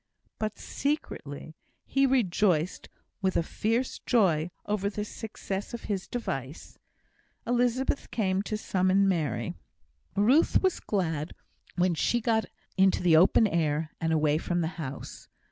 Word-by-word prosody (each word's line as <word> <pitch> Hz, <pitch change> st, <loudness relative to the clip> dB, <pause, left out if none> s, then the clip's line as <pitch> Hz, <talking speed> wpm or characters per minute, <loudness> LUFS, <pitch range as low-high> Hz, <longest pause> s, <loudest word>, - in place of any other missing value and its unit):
But, 215 Hz, -1 st, -2 dB
secretly, 155 Hz, -, -4 dB, 0.3 s
he 275 Hz, 0 st, +2 dB
rejoiced 190 Hz, -9 st, +1 dB, 0.3 s
with 190 Hz, -1 st, +1 dB
a -, -, +2 dB
fierce 230 Hz, +9 st, -1 dB
joy 175 Hz, -9 st, +2 dB, 0.2 s
over 205 Hz, -1 st, 0 dB
the 210 Hz, 0 st, -4 dB
success 205 Hz, -1 st, -5 dB
of 235 Hz, -, -9 dB
his 195 Hz, -3 st, -3 dB
device. 140 Hz, -, -5 dB, 0.7 s
Elizabeth 245 Hz, +3 st, 0 dB
came 190 Hz, -4 st, 0 dB
to 215 Hz, +1 st, -3 dB
summon 190 Hz, -1 st, +2 dB
Mary. 145 Hz, -, -1 dB, 0.6 s
Ruth 245 Hz, -, +4 dB
was 375 Hz, -2 st, +2 dB
glad 165 Hz, -6 st, -2 dB, 0.4 s
when 180 Hz, 0 st, +2 dB
she 240 Hz, +8 st, +1 dB
got 225 Hz, -1 st, +1 dB, 0.3 s
into 190 Hz, -1 st, +3 dB
the 170 Hz, -3 st, +5 dB
open 185 Hz, +7 st, +6 dB
air, 160 Hz, -4 st, 0 dB
and 165 Hz, 0 st, +1 dB
away 155 Hz, -1 st, +2 dB
from 175 Hz, +1 st, -1 dB
the 160 Hz, -, 0 dB
house. 135 Hz, -2 st, -7 dB
190 Hz, 130 wpm, -28 LUFS, 160-225 Hz, 0.7 s, open